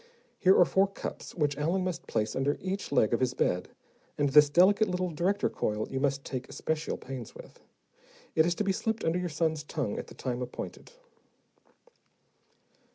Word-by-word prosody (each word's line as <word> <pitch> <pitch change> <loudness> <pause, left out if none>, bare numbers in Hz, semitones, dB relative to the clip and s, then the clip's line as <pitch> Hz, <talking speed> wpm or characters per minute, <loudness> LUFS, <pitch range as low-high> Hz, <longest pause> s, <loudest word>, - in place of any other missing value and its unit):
Here 190 -1 +5
are 180 - +7
four 190 +3 +3
cups 195 - -7
which 150 -5 +1
Allen 170 +5 +1
must 180 -2 -4
place 110 0 -1
under 140 +2 0
each 190 -2 -4
leg 110 -5 +3
of 115 - +2
his 130 -1 0
bed, 90 0 0 0.5
and 145 -1 +2
this 150 +1 +7
delicate 195 +7 +5
little 180 -1 -1
director 185 +6 +1
coil 105 0 -2
you 135 - -1
must 140 0 0
take 130 -2 -5
especial 160 0 -2
pains 130 -4 -8
with. - - -13 0.7
It 160 +1 +4
is 175 - +1
to 210 - -1
be 195 - +1
slipped 220 +3 -2
under 165 +2 +1
your 180 -1 -2
son's 160 0 0
tongue 145 -8 -3
at - - -7
the - - -13
time 125 -1 -3
appointed." 125 0 -7
155 Hz, 180 wpm, -29 LUFS, 135-185 Hz, 0.7 s, are